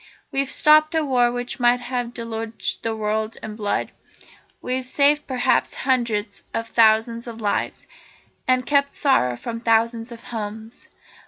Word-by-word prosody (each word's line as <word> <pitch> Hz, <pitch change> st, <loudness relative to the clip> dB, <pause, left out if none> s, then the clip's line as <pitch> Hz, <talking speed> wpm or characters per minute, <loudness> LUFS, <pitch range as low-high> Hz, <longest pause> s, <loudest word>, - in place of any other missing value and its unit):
We've 275 Hz, 0 st, -1 dB
stopped 310 Hz, +3 st, +4 dB
a 320 Hz, -1 st, +2 dB
war 245 Hz, -3 st, +3 dB
which 245 Hz, +1 st, -5 dB
might 245 Hz, 0 st, +4 dB
have 245 Hz, -1 st, -4 dB
deluged 225 Hz, -1 st, -4 dB
the 225 Hz, -1 st, -2 dB
world 215 Hz, +1 st, -2 dB
in 215 Hz, -1 st, -6 dB
blood. 205 Hz, -2 st, -2 dB, 0.7 s
We've 255 Hz, +1 st, -2 dB
saved 285 Hz, +3 st, +2 dB
perhaps 255 Hz, -2 st, +1 dB
hundreds 235 Hz, -5 st, -1 dB
of 230 Hz, 0 st, -3 dB
thousands 230 Hz, +1 st, +3 dB
of 230 Hz, -1 st, -7 dB
lives, 205 Hz, -2 st, -2 dB, 0.6 s
and 255 Hz, -1 st, +2 dB
kept 280 Hz, 0 st, +2 dB
sorrow 125 Hz, -, +2 dB
from 230 Hz, -, -5 dB
thousands 230 Hz, 0 st, +1 dB
of 230 Hz, -1 st, -10 dB
homes. 220 Hz, 0 st, -7 dB
235 Hz, 145 wpm, -22 LUFS, 225-255 Hz, 0.7 s, stopped